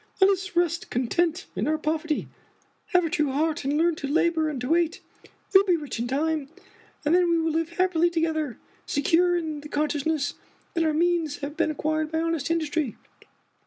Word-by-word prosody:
Let 385 0 +6
us 380 -1 -3
rest 345 -1 +1
content 330 +9 0
in - - -1
our 310 +1 +2
poverty. 310 0 -1 0.6
Have 360 -3 +3
a - - -1
true 300 -5 +1
heart, 310 +3 0
and 280 +2 0
learn 340 +2 +3
to 280 - -4
labor 320 +1 +2
and 290 -4 -4
to 250 - -3
wait. 335 0 +2 0.5
You 385 - +10
will 395 - +1
be 360 - +4
rich 295 -6 -6
in 235 - -1
time; 295 +2 -1 0.6
and 300 - +3
then 355 -1 +4
we 335 - +3
will 325 0 +1
live 330 +1 -1
happily 355 -2 +3
together, 320 -6 -1 0.3
secure 340 +5 +3
in 310 -3 -4
the 300 - -10
con 300 +1 0
sciousness 290 0 -1 0.4
that 335 - +1
our 315 - +2
means 330 -3 +1
have 285 +1 -5
been - - +1
acquired 310 +1 -1
by 320 - 0
honest 330 -2 -1
industry. 315 -5 -1
320 Hz, 200 wpm, -26 LUFS, 300-340 Hz, 0.6 s, You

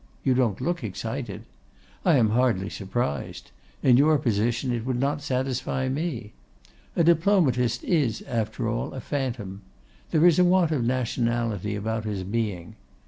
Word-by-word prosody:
You 130 - +3
don't 120 -6 +1
look 170 +3 -2
excited. 105 -4 -5 0.6
I 175 -4 +4
am 115 -5 +3
hardly 115 -5 +1
surprised. 95 -6 -3 0.3
In 125 -2 +6
your 150 +3 +5
position 115 +1 0
it 115 -2 -2
would 125 0 -1
not 145 +2 0
satisfy 130 -1 -1
me. 130 -7 -3 0.6
A 170 - +3
Diplomatist 160 - +3
is, 145 - +1
after 115 0 -2
all, 115 +2 -2
a - - -4
phantom. 115 -8 -4 0.5
There 160 +1 +3
is 175 -1 +6
a - - +6
want 180 -2 +3
of 140 -6 0
nationality 115 -4 -1
about 110 +2 -3
his 100 -3 -3
being. 100 -4 -3
125 Hz, 145 wpm, -25 LUFS, 110-140 Hz, 0.6 s, In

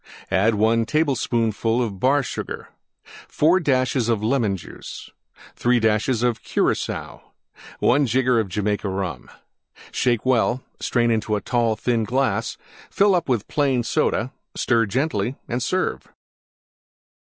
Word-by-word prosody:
1 110 +3 +2
tablespoonful 120 -6 +1
Bar 130 +9 +2
Sugar. - - -6 0.6
4 165 +5 +3
dashes 130 -6 +1
Lemon 110 -2 +1
Juice. 85 - -10 0.4
3 120 0 +2
dashes 110 +2 +1
Curacoa. 120 -2 -1 0.6
1 140 +2 +3
jigger 125 -1 +2
Jamaica 105 +1 -2
Rum. 95 -8 -4 0.6
Shake 120 -3 0
well; 125 0 +2 0.2
strain 120 -1 +1
into 110 -1 0
tall, 120 -3 +1
thin 115 0 0
glass; 130 +4 -1 0.3
fill 200 0 +3
up 175 -5 0
with 120 -5 0
Plain 135 -5 +1
Soda; 115 +1 0 0.2
stir 115 -3 +2
gently 125 0 -1
and 120 +1 -2
serve. 185 +9 -1
120 Hz, 110 wpm, -22 LUFS, 110-130 Hz, 0.6 s, 4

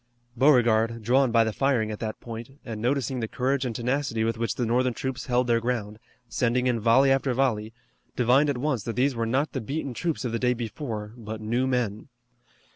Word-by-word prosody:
Beauregard, 115 -4 +3
drawn 130 +2 +3
by 115 0 +5
the 110 -1 -2
firing 125 -5 +1
at 105 - -6
that 110 -1 -4
point, 120 +3 -8
and 110 -3 -5
noticing 130 +1 0
the 115 - -2
courage 135 +3 -1
and 120 -3 -3
tenacity 125 -1 -1
with 115 0 0
which 115 0 -2
the 125 - -1
Northern 125 +1 +1
troops 130 -1 -4
held 125 0 +2
their 120 -1 +2
ground, 110 -3 -3 0.3
sending 125 +1 0
in 125 -2 +1
volley 125 +5 +4
after 135 0 +2
volley, 115 -5 0 0.4
divined 130 +5 +3
at 140 - 0
once 130 -3 -1
that 115 - -3
these 135 +2 +2
were 115 -1 -2
not 135 +6 0
the 130 - -3
beaten 140 +3 -4
troops 160 +1 -2
of 120 - -2
the 115 - -1
day 125 0 +2
before, 110 -2 -5
but 110 -1 -7
new 120 +4 0
men. 115 -5 -1
120 Hz, 205 wpm, -26 LUFS, 115-130 Hz, 0.4 s, by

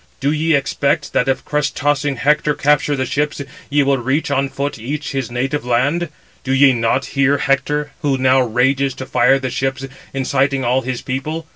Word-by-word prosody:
Do 140 +1 +1
ye 155 +1 +2
expect 140 +2 0
that 125 - +1
if 135 - -1
crest 150 -1 -1
tossing 145 -1 0
Hector 150 +3 +1
capture 145 0 +2
the 130 -1 -1
ships, 145 +4 -1 0.3
ye 145 0 +3
will 135 -1 +1
reach 135 +5 -1
on 135 0 +1
foot 140 -2 -4
each 140 +7 -4
his 135 -4 -3
native 130 +4 -2
land? 140 +8 0 0.3
Do 130 - -1
ye 135 0 +5
not 115 +2 0
hear 140 0 +3
Hector, 145 +2 0
who 140 -2 +1
now 130 0 +3
rages 130 +3 +1
to 130 - -6
fire 130 +1 +3
the 130 -2 -4
ships, 135 +1 -2 0.3
inciting 135 0 0
all 125 +2 +2
his 130 -1 -4
people? 150 +5 -4
135 Hz, 185 wpm, -18 LUFS, 130-145 Hz, 0.3 s, ye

